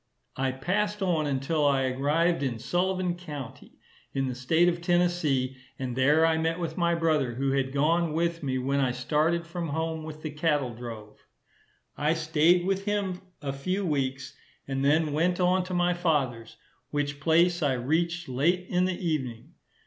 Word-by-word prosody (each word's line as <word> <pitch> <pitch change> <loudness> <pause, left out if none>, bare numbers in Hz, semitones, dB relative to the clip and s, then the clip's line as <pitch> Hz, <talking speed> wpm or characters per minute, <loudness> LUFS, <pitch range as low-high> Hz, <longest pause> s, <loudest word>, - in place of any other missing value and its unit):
I 135 0 0
passed 205 +9 -1
on 165 -5 +1
until 140 +3 0
I 140 -2 +3
arrived 150 +6 +1
in 130 -4 -1
Sullivan 180 +8 0
county, 150 -8 -9 0.4
in 135 -1 0
the 130 - -2
state 160 +8 +2
of 170 -1 0
Tennessee, 175 -7 +1 0.2
and 130 -2 -4
there 145 +5 +4
I 160 -1 +2
met 165 +2 0
with 165 -2 -3
my 170 -1 +2
brother, 155 -7 +1
who 135 +2 0
had 135 -1 0
gone 160 +3 +1
with 170 +1 0
me 130 -3 -1
when 135 +2 0
I 130 -3 +1
started 155 +6 0
from 170 0 -4
home 160 +1 -2
with 155 0 -9
the 155 - -3
cattle 150 -5 0
drove. 110 -3 -9 0.8
I 150 +3 +2
staid 160 +2 +3
with 195 +1 -1
him 200 -3 -1 0.2
a 135 -1 -2
few 185 +8 -2
weeks, 135 -3 -2 0.3
and 135 0 -2
then 150 +1 +3
went 175 +4 +1
on 180 +1 +3
to 185 - -5
my 175 0 +2
father's, 140 -10 -1 0.3
which 145 0 -2
place 170 +3 +3
I 145 -3 +2
reached 165 +7 -1
late 170 +8 +1
in 180 0 +2
the 185 -1 -2
evening. 130 -2 -3
155 Hz, 170 wpm, -27 LUFS, 135-175 Hz, 0.8 s, there